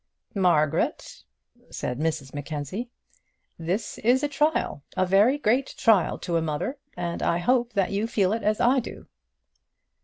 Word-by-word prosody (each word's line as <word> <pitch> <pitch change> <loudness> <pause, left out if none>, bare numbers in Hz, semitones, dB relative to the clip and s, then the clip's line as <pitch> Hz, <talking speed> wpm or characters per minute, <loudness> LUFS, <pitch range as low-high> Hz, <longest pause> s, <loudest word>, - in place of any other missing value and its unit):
"Margaret," 170 -7 +1 0.5
said 125 +1 -4
Mrs 150 -4 -2
Mackenzie, 150 - -5 0.7
"this 180 +7 -3
is 250 +5 +3
a - - +2
trial, 295 - 0 0.2
a 185 - +3
very 205 +9 +4
great 260 0 0
trial 220 -8 +3
to 170 -1 -2
a - - +1
mother, 160 - -3 0.2
and 175 -1 -3
I 170 - +1
hope 240 +5 +1
that 195 -3 +1
you 205 +3 0
feel 200 -4 +1
it 225 - -2
as 210 +1 +1
I 260 +3 +4
do." 235 - -8
200 Hz, 150 wpm, -25 LUFS, 165-240 Hz, 0.7 s, very